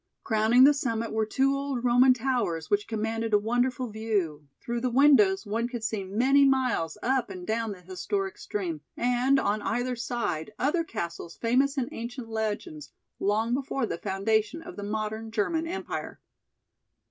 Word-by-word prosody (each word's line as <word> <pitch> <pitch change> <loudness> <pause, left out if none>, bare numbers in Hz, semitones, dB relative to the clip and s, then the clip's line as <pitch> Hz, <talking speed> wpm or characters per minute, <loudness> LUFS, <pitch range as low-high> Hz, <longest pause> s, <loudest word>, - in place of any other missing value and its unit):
Crowning 220 +3 +4
the 290 +2 +8
summit 230 -5 -2
were 220 -1 0
two 270 +5 +2
old 275 -3 -3
Roman 250 +1 +5
towers 230 -11 -1
which 205 0 +2
commanded 225 0 -1
a - - +7
wonderful 245 +4 0
view; 195 -9 -2
through 235 0 -3
the 255 - 0
windows 235 -7 +5
one 225 +3 -1
could 240 -2 -6
see 215 -2 -2
many 255 +9 +3
miles 255 -11 +1
up 260 -2 +1
and 185 -2 -7
down 225 +1 -1
the 185 - -14
historic 385 - -3
stream 360 -7 -4 0.2
and 250 +3 +2
on 210 -2 0
either 245 +3 -1
side 225 -7 -3
other 315 +6 +1
castles 170 - -6
famous 265 +5 +2
in 255 -2 0
ancient 235 0 -6
legends 205 - -4 0.3
long 220 +4 +1
before 270 -1 -1
the 170 - -4
foundation 215 +9 0
of 355 +1 -9
the - - -7
modern 215 +2 -3
German 320 +10 -1
empire. 370 +3 -5
230 Hz, 160 wpm, -27 LUFS, 210-260 Hz, 0.3 s, the